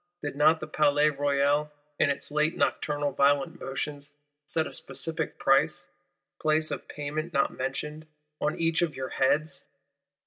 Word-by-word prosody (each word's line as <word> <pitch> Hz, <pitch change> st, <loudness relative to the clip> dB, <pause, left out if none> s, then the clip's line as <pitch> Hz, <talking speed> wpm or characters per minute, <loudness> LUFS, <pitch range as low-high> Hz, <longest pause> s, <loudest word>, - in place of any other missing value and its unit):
Did 145 Hz, -2 st, -3 dB
not 155 Hz, +3 st, +5 dB
the -, -, -5 dB
Palais 150 Hz, 0 st, +3 dB
Royal 145 Hz, +1 st, +1 dB, 0.3 s
in 145 Hz, -, +4 dB
its 140 Hz, -, -3 dB
late 150 Hz, +2 st, +1 dB
nocturnal 145 Hz, -1 st, 0 dB
"violent 145 Hz, +5 st, +2 dB
motions," 145 Hz, +1 st, -5 dB, 0.3 s
set 160 Hz, -1 st, 0 dB
a -, -, -6 dB
specific 165 Hz, -1 st, -2 dB
price 135 Hz, 0 st, +3 dB, 0.6 s
(place 155 Hz, 0 st, +2 dB
of -, -, -5 dB
payment 150 Hz, +3 st, -4 dB
not 140 Hz, -, +2 dB
mentioned) 150 Hz, +4 st, -4 dB, 0.3 s
on 150 Hz, -, 0 dB
each 165 Hz, 0 st, +2 dB
of 170 Hz, -3 st, 0 dB
your 130 Hz, 0 st, -4 dB
heads? 140 Hz, +1 st, +1 dB
150 Hz, 145 wpm, -28 LUFS, 140-155 Hz, 0.6 s, not